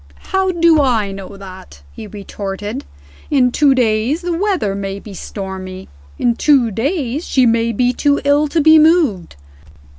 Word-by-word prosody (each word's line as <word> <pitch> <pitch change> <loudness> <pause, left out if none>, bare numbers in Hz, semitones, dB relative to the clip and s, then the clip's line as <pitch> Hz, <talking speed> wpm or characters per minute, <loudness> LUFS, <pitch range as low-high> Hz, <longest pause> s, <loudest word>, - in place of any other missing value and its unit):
"How 380 0 +2
do 335 -3 +3
I 225 -7 0
know 195 0 -9
that?" 185 - -12
he 215 - -9
retorted. 205 +4 -6 0.4
"In 255 -4 +2
two 280 0 +3
days 240 +5 0
the 350 -1 -2
weather 365 - -1
may 195 0 -5
be 200 0 -11
stormy. 190 -1 -7 0.3
In 240 - +1
two 260 -4 +3
days 275 - -2
she 260 -2 +2
may 230 0 +1
be 245 +3 +1
too 285 +2 +1
ill 290 +1 +3
to 320 +2 0
be 315 +1 +6
moved. 305 - +2
240 Hz, 155 wpm, -17 LUFS, 200-300 Hz, 0.4 s, be